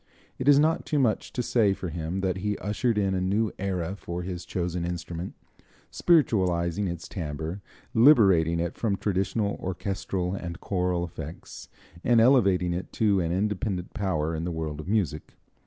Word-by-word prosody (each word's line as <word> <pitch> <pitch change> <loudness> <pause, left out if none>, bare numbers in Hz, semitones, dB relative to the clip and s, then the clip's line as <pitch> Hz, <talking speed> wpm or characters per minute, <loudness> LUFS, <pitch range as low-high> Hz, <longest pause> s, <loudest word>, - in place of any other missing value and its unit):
It 130 - -3
is 145 -1 +8
not 155 +3 +3
too 150 - 0
much 125 -6 +1
to 125 - -1
say 110 -5 +3
for 90 - -5
him 85 +3 -3
that 95 -1 0
he 105 +2 -2
ushered 105 +3 -1
in 100 -2 +1
a 95 - 0
new 100 +3 +1
era 95 -2 -2
for 90 -2 -5
his 90 -2 -5
chosen 90 -1 -2
instrument, 85 0 -5 0.6
spiritualizing 95 - +2
its 85 -1 -5
timbre, 80 +2 -5 0.3
liberating 95 - +5
it 85 0 -1
from 105 -4 -1
traditional 100 +1 -1
orchestral 95 0 -3
and 90 -3 -5
choral 90 -2 -1
effects, 80 -1 -9 0.3
and 120 -1 +4
elevating 100 -8 +4
it 90 +2 -5
to 105 -3 +2
an 85 -2 -1
independent 95 -1 -2
power 80 -6 -1
in 80 - -3
the 90 - -2
world 80 -2 -4
of 80 - -7
music. 95 -8 -1
95 Hz, 165 wpm, -27 LUFS, 85-105 Hz, 0.6 s, is